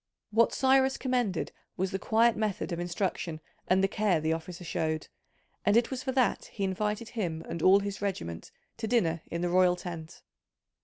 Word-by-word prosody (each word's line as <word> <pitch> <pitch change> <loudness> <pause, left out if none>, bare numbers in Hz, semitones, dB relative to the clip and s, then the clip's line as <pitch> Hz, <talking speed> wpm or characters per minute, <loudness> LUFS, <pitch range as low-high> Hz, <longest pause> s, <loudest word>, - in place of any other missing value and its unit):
What 230 +2 +4
Cyrus 265 0 +3
commended 245 -9 0 0.3
was 190 +1 -1
the 195 - -2
quiet 230 +2 +3
method 210 -3 -2
of 170 - -2
instruction 175 -2 -2 0.3
and 190 +1 +3
the - - +5
care 200 -4 +1
the 160 +1 +1
officer 170 +2 -6
showed, 155 -1 -2 0.5
and 205 +2 +4
it 235 +2 +2
was 260 -1 -3
for 260 - -2
that 255 -2 +2
he 200 - -5
invited 210 +4 -1
him 175 -9 -3
and 170 - -4
all 195 +3 +6
his 200 0 -4
regiment 85 - -4 0.3
to 225 -1 -3
dinner 170 -9 +2
in 170 - -3
the 175 - 0
royal 180 0 +4
tent. 170 -3 -8
190 Hz, 185 wpm, -29 LUFS, 170-225 Hz, 0.5 s, all